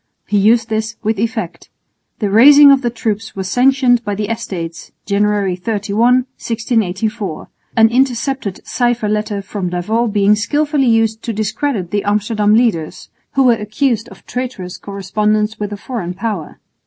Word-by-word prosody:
He 205 - +1
used 225 +2 +3
this 220 0 -2
with 220 -1 -1
effect. 220 -5 -4 0.5
The 205 -3 -2
raising 280 +6 +8
of 275 -1 +4
the 240 - 0
troops 225 -2 -4
was 190 -1 -4
sanctioned 250 +1 +3
by 205 -2 -3
the 210 0 -3
Estates 180 -8 -5
(January 200 -2 +1
31, 225 +6 +1
1684), 220 -4 -2 0.3
an 225 0 +7
intercepted 255 -3 -1
cipher 240 -3 0
letter 210 -1 -2
from 195 -2 -4
D'Avaux 215 +6 -1
being 205 0 +3
skilfully 290 +5 0
used 225 -1 +1
to 230 - -4
discredit 215 -2 -2
the 205 -1 -1
Amsterdam 210 +1 +1
leaders, 215 -10 0 0.2
who 270 - +3
were 250 -2 +5
accused 225 +2 -1
of - - -16
traitorous 245 -8 -5
correspondence 210 +2 -1
with 210 0 -3
a 205 - -5
foreign 200 -6 -5
power. 200 -5 -4
215 Hz, 150 wpm, -16 LUFS, 200-240 Hz, 0.5 s, raising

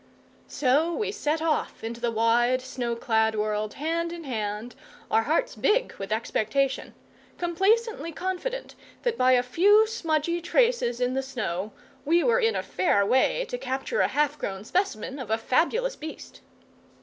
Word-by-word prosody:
So 290 +5 +2
we 430 - -1
set 320 -6 -1
off 315 -7 -1
into 230 +1 -5
the 240 - +1
wide 235 +3 +2
snow 245 -2 -3
clad 220 -1 +1
world, 210 0 -2
hand 335 +3 -1
in 340 -1 -7
hand, 220 -3 -4 0.4
our 445 +1 +4
hearts - - 0
big - - +1
with 195 +1 -6
expectation, 230 +4 -1 0.4
complacently 385 +3 +1
confident 375 +9 -4 0.3
that 485 -2 +1
by 255 0 +4
a 245 -1 +4
few 400 - +5
smudgy 340 -6 -1
traces 410 - +2
in 250 +1 +1
the 265 - 0
snow 215 -7 -4 0.3
we 335 +3 +3
were 235 -4 +3
in 225 -2 +2
a 190 - -1
fair 190 +2 +1
way 265 - +2
to 245 - -5
capture 270 - -2
a - - +4
half 295 0 0
grown 195 0 -4
specimen 275 - -2
of 250 -5 -6
a 220 - +2
fabulous 440 - +1
beast. 315 +1 -9
270 Hz, 160 wpm, -26 LUFS, 230-345 Hz, 0.4 s, few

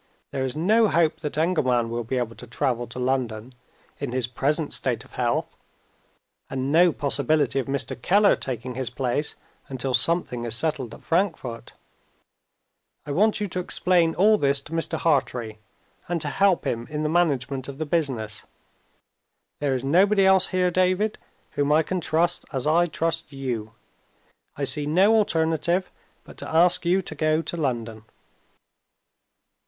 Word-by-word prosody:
There 135 - -2
is 130 +2 -2
no 215 +7 +4
hope 165 -4 +1
that 150 -1 -4
Engelman 130 -9 +1
will 120 0 -2
be 130 +3 -3
able 115 -2 -2
to 125 - -10
travel 120 0 -1
to 120 - -10
London, 125 -2 -2 0.5
in 140 -4 -4
his 130 -2 0
present 145 +6 -1
state - - -1
of - - -20
health, - - -1 0.9
and 135 +1 -2
no 170 +2 +5
possibility 145 -1 +1
of 130 - -3
Mr. 135 -2 -3
Keller 205 +6 +4
taking 125 -1 -5
his 130 -1 -3
place 130 +4 -2 0.3
until 130 0 -3
something 125 -2 +1
is 115 -1 -1
settled 135 -4 -2
at - - -17
Frankfort. 165 -10 -2 1.3
I 145 - -5
want 210 +9 +2
you 205 - -1
to 180 - -3
explain 175 -2 +1
all 210 +3 +4
this 140 0 +2
to 150 - -15
Mr. 165 0 -1
Hartrey, 125 -8 0 0.5
and 175 -1 -1
to 145 - 0
help 195 +4 +2
him 115 0 -2
in 150 0 -3
the - - +1
management 140 -5 0
of 140 -1 -8
the 155 - -3
business. 130 -10 -2 1.1
There 140 -2 0
is 130 - -3
nobody 195 +7 +4
else 190 -1 +5
here, 180 -1 +1
David, 185 +4 +1 0.3
whom 145 0 0
I 155 +2 +4
can 185 +3 -3
trust, 170 +2 +1
as 130 -3 -3
I 170 +3 +3
trust 165 -1 -1
you. 120 -5 -4 0.8
I 145 - -3
see 145 +1 -2
no 190 +8 +4
alternative 170 -2 +1 0.3
but - - -15
to - - -6
ask 170 +2 +4
you 185 +2 +2
to 160 - -6
go 155 +1 +1
to - - -4
London." 115 -8 -3
150 Hz, 160 wpm, -24 LUFS, 130-175 Hz, 1.3 s, no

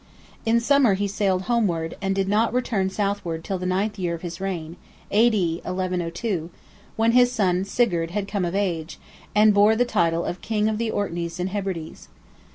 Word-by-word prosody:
In 230 +1 +4
summer 250 -3 +4
he 200 +1 -1
sailed 195 -2 0
homeward, 185 -9 0
and 195 -1 0
did 195 -1 0
not 215 +3 +2
return 215 -6 0
southward 195 -5 -2
till 190 -2 -3
the 180 - -3
ninth 200 +3 -1
year 175 -2 -1
of 165 - -11
his 170 0 -6
reign 170 -4 -4 0.4
(A.D. 205 -7 +3
1102), 180 0 -3 0.5
when 225 +1 +3
his 245 0 +5
son, 190 -6 +1
Sigurd, 175 -8 +1
had 195 +2 -3
come 200 -2 -2
of 175 +1 -2
age, 170 -6 -2 0.4
and 210 0 +6
bore 205 +2 +5
the 245 +2 +2
title 170 -7 +1
of 175 - -4
"King 215 -1 0
of 220 0 -1
the 230 -1 -1
Orkneys 170 -5 -3
and 180 +1 -1
Hebrides." 190 -5 -5
195 Hz, 180 wpm, -24 LUFS, 175-215 Hz, 0.5 s, and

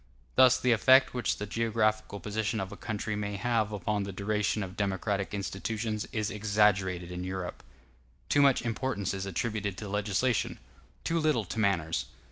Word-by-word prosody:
Thus 130 -1 +6
the 125 - +2
effect 130 +4 +6
which 125 -2 0
the 105 - -4
geographical 110 -1 0
position 110 +1 -2
of 95 -1 -4
a - - -7
country 110 -1 -3
may 105 -1 -3
have 110 -1 0
upon 105 +1 -1
the 100 0 -4
duration 105 +2 0
of 95 -1 -7
democratic 100 0 -1
institutions 105 +2 -3
is 110 0 -1
exaggerated 100 -4 +1
in 90 0 -4
Europe. 95 -1 -5 0.7
Too 145 - +4
much 140 -4 +4
importance 115 -4 -2
is 95 0 -4
attributed 100 0 -2
to 105 - -6
legislation, 105 +4 0 0.5
too 165 0 +1
little 155 -9 +2
to 110 - -4
manners. 90 -6 +1
105 Hz, 160 wpm, -30 LUFS, 100-115 Hz, 0.7 s, Thus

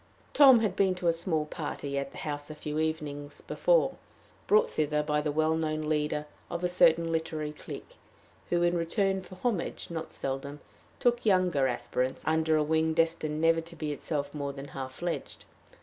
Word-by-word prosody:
Tom 265 -5 +8
had 205 -4 0
been 190 -2 +3
to 180 -1 -2
a - - +3
small 165 -2 -1
party 145 -2 -5
at 140 0 -2
the - - -12
house 145 -1 -4
a 155 - -7
few 150 0 -4
evenings 150 -2 -3
before, - - +2 0.5
brought 440 +3 +5
thither 150 0 0
by 150 0 +1
the 150 0 -1
well 155 +1 +2
known 155 -1 -1
leader 150 -1 0 0.2
of 170 +1 -4
a - - +3
certain 170 -2 +4
literary 160 -2 -2
clique, 150 - -10 0.5
who, 175 0 +2
in 175 0 +3
return 190 +3 +1
for 185 - -12
homage, 200 -2 -2
not 160 -1 -5
seldom, 135 +2 -4 0.4
took 240 0 +2
younger 180 -9 +3
aspirants 125 +1 -2
under 160 0 +2
a 155 - +3
wing 160 +1 +1
destined 165 -2 +1
never 165 0 +4
to 170 +1 -12
be 155 -2 -3
itself 145 -1 -3
more 140 -2 -3
than 140 +1 -8
half 130 -1 -6
fledged. 175 +5 -5
160 Hz, 180 wpm, -29 LUFS, 150-175 Hz, 0.5 s, Tom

